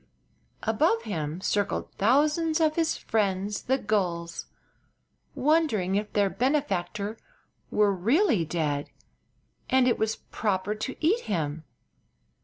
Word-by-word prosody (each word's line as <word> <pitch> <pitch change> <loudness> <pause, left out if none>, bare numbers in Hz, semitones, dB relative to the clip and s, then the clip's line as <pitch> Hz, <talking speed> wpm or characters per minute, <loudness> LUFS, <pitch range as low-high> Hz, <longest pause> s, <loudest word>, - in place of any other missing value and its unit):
Above 225 +1 +2
him 160 -6 -3
circled 205 +1 -1
thousands 300 - +2
of 310 -1 +2
his 330 -1 +1
friends 200 -1 -1
the 265 +1 +1
gulls, 170 -8 -2 0.9
wondering 280 - +2
if 205 +1 -1
their 205 -1 +3
benefactor 215 -4 -1 0.5
were 205 -1 +3
really 230 - +2
dead 150 -3 -2 0.8
and 260 -1 +4
it 245 - +2
was 220 0 0 0.2
proper 205 -2 -1
to 215 +5 -5
eat 410 +9 +4
him. 155 -5 -2
210 Hz, 110 wpm, -27 LUFS, 185-265 Hz, 0.9 s, and